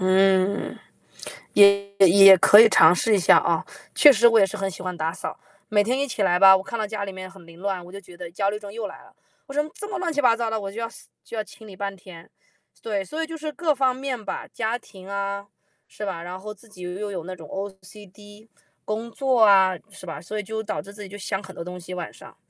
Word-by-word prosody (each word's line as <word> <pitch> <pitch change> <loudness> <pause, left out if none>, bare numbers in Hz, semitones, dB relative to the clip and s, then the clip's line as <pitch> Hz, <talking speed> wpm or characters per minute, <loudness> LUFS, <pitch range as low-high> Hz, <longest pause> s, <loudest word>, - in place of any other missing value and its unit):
嗯， 190 +1 +2 0.8
也 200 -1 +5
也 195 +1 +8
可 195 +2 +8
以 225 - +9
尝 195 - +6
试 215 +4 +2
一 - - +2
下 175 - +6
啊。 - - 0 0.3
确 295 - +8
实 235 -2 +5
我 230 -1 +4
也 195 - +5
是 195 +2 -6
很 195 -1 -2
喜 185 0 -9
欢 180 -1 -4
打 160 +1 -2
扫， - - -6 0.3
每 205 -1 +3
天 245 +5 -1
一 280 - 0
起 230 - -4
来 180 -3 +3
吧， 190 +1 +8
我 190 - 0
看 195 +4 -6
到 220 - -2
家 205 -1 -5
里 195 - -7
面 185 0 -9
很 190 -2 -16
凌 170 0 -15
乱， 190 -2 -3
我 - - -13
就 200 - -9
觉 175 -2 -16
得 175 -1 -8
焦 195 +3 -1
虑 210 +1 -4
症 205 -1 -10
又 220 0 -5
来 195 - -13
了。 - - -21 0.3
我 275 - -10
说： 295 - +1
“这 415 - -6
么 410 - -4
乱 350 -2 -2
七 295 - -2
八 240 -4 +4
糟 230 -1 -2
的，” 220 0 -2
我 200 -1 -6
就 230 +3 -7
要 230 - -3 0.3
就 230 - -9
要 215 - -1
清 220 - -15
理 200 -3 -12
半 200 0 -4
天， 175 -2 -14 0.5
对， 205 -3 -3
所 315 - -4
以 - - -5
就 325 0 -7
是 310 0 -5
各 320 -2 0
方 260 -2 +1
面 260 -3 -5
吧， 190 - -5
家 225 +1 -2
庭 190 -5 -15
啊， 200 0 -4 0.4
是 210 - -8
吧？ 185 -4 -5
然 175 +2 -7
后 210 +3 -8
自 210 +3 -18
己 195 -4 -14
又 185 +4 -5
有 185 -4 -5
那 185 +2 -7
种 165 -4 -12
OC 195 +2 -9
D， 205 +2 -17 0.3
工 220 +2 -4
作 260 +1 0
啊， 190 -3 +5
是 200 -1 -12
吧？ 165 -4 -7
所 195 +7 -7
以 210 - -3
就 220 +2 -5
导 220 - -4
致 200 - -13
自 210 - -11
己 - - -9
就 200 +2 -10
想 195 0 -4
很 190 -2 -12
多 - - -6
东 180 +1 -8
西， 180 +1 -9
晚 175 -2 -6
上。 - - -15
200 Hz, 290 characters per minute, -23 LUFS, 185-220 Hz, 0.8 s, 以